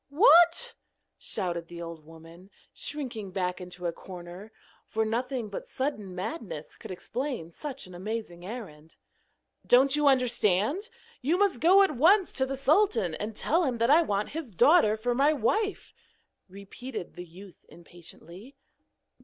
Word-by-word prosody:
'WHAT?' 345 - +5 0.5
shouted 175 -5 -2
the 170 0 -10
old 165 -2 -8
woman, 165 +3 -14 0.2
shrinking 245 -9 -5
back 180 -1 -2
into 180 0 -9
a 170 - -1
corner, 180 +4 -10 0.4
for 220 0 -1
nothing 240 +1 -2
but 200 - -7
sudden 215 -9 -4
madness 185 - -6
could - - -11
explain 235 - -4
such 275 - -7
an 185 - -12
amazing 185 -2 -5
errand. 180 -8 -9 0.7
'Don't 265 +3 +4
you 295 -1 +2
understand? 250 - +2 0.3
You 305 +7 +1
must 390 - +1
go 375 +5 +7
at 380 -7 0
once 360 - +4
to 265 0 0
the 270 0 -4
sultan 270 - +2
and 210 +6 -5
tell 335 +10 +1
him 255 -6 -1
that 230 +3 +2
I 320 +3 +7
want 205 -9 -1
his 290 - -7
daughter 245 - +5
for 245 +3 -1
my 280 +5 +3
wife,' 405 - -1 0.6
repeated 200 +3 -8
the 175 - -8
youth 180 +3 -14
impatiently. 175 - -12
225 Hz, 145 wpm, -28 LUFS, 180-285 Hz, 0.7 s, go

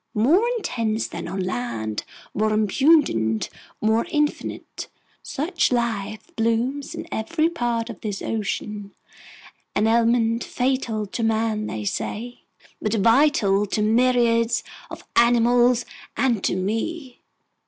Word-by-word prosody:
More 315 - +4
intense 230 - -1
than - - -6
on 190 - -3
land, 115 - -3 0.3
more 215 +1 +1
abundant, 215 - +2 0.3
more 220 +1 +2
infinite, 295 -1 -2 0.3
such 330 +3 -1
life 220 -4 -2
blooms 235 +5 -1
in - - -6
every 315 +9 0
part 240 -8 -1
of 235 -5 -9
this 205 -3 -3
ocean, 210 -1 -4 0.8
an 210 - +2
element 230 0 +2
fatal 245 -4 -1
to 205 +4 -5
man, 220 -1 0
they 105 -1 -5
say, 240 - -4 0.4
but 215 +1 0
vital 220 -3 +3
to 210 +2 0
myriads 235 0 +3 0.3
of - - -9
animals—and 240 -1 +2
to - - +1
me!" 240 - -3
230 Hz, 110 wpm, -23 LUFS, 210-245 Hz, 0.8 s, More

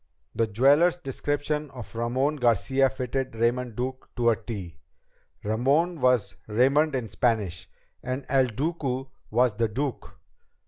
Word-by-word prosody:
The 115 - +1
jeweler's 145 - +4
description 145 0 -2
of 125 -4 -10
Ramon 130 +6 0
Garcia 125 +2 +3
fitted 130 0 -3
Raymond 120 +1 0
Duke 130 +2 -4
to 120 -2 +3
a - - +2
T. 100 -8 -7 0.6
Ramon 140 +10 +1
was 125 -4 +2
Raymond 135 +7 +3
in 125 -3 -2
Spanish! 100 -4 -1 0.3
And 130 +2 -4
El 135 -2 +3
Duque 135 0 -3 0.2
was 120 +1 +3
The 115 0 +2
Duke! 130 +4 -4
125 Hz, 130 wpm, -26 LUFS, 115-140 Hz, 0.6 s, jeweler's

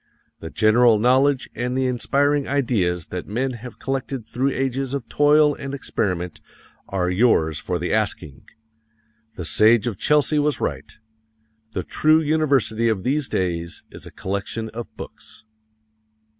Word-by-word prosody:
The 80 - -7
general 110 +3 +4
knowledge 130 +4 +3
and 125 +2 -2
the 130 - +1
inspiring 140 +3 +1
ideas 105 - 0
that 90 -1 -5
men 130 +6 -1
have 125 0 -9
collected 135 -2 -4
through 130 +5 -1
ages 135 0 -2
of 125 -5 -5
toil 150 0 +4
and 140 0 -6
experiment 90 - -3 0.5
are 90 -2 0
yours 85 -7 +2
for 90 - -2
the 90 +1 -2
asking. 100 -10 -2 0.9
The 90 - -6
Sage 110 +4 +4
of 115 -6 -3
Chelsea 150 0 +3
was 150 0 +1
right: - - -3 0.8
"The 95 - -2
true 155 - +3
university 140 -8 +1
of 100 -4 -1
these 140 +2 0
days 85 -2 -2
is - - -8
a - - -11
collection 100 +3 -4
of 115 +1 -7
books." - - -11
120 Hz, 145 wpm, -22 LUFS, 95-140 Hz, 0.9 s, general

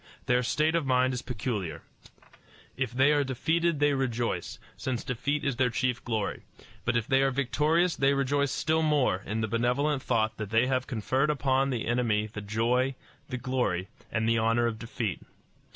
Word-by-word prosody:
Their 125 0 +3
state 155 +6 +1
of 170 -1 +1
mind 130 -1 +2
is 125 - -3
peculiar. 105 - -4 0.9
If 130 -3 -2
they 135 +4 +4
are 145 -1 +3
defeated 160 +5 0
they 145 0 +3
rejoice, 120 -3 -2 0.2
since 125 -3 -3
defeat 140 +3 -2
is 140 -4 -1
their 130 -1 +3
chief 125 +2 -1
glory; 110 -4 -2 0.4
but 120 - +2
if 115 - -1
they 135 0 +3
are 135 - +3
victorious 150 +6 +1
they 135 +1 +3
rejoice 140 +1 +1
still 160 +1 +1
more 145 -11 +2
in 110 +2 -2
the 110 - 0
benevolent 125 +6 +1
thought 110 -3 0
that 110 -2 -5
they 115 +3 +3
have 130 0 0
conferred 130 +5 0
upon 135 -2 +1
the 120 -4 -2
enemy 115 -3 +1
the 105 -1 -7
joy, 120 +6 0 0.3
the 125 - -3
glory, 120 -8 -1 0.2
and 110 0 0
the 115 0 +3
honor 115 +1 +2
of 115 -2 -2
defeat. 115 -4 -3
125 Hz, 180 wpm, -28 LUFS, 115-140 Hz, 0.9 s, they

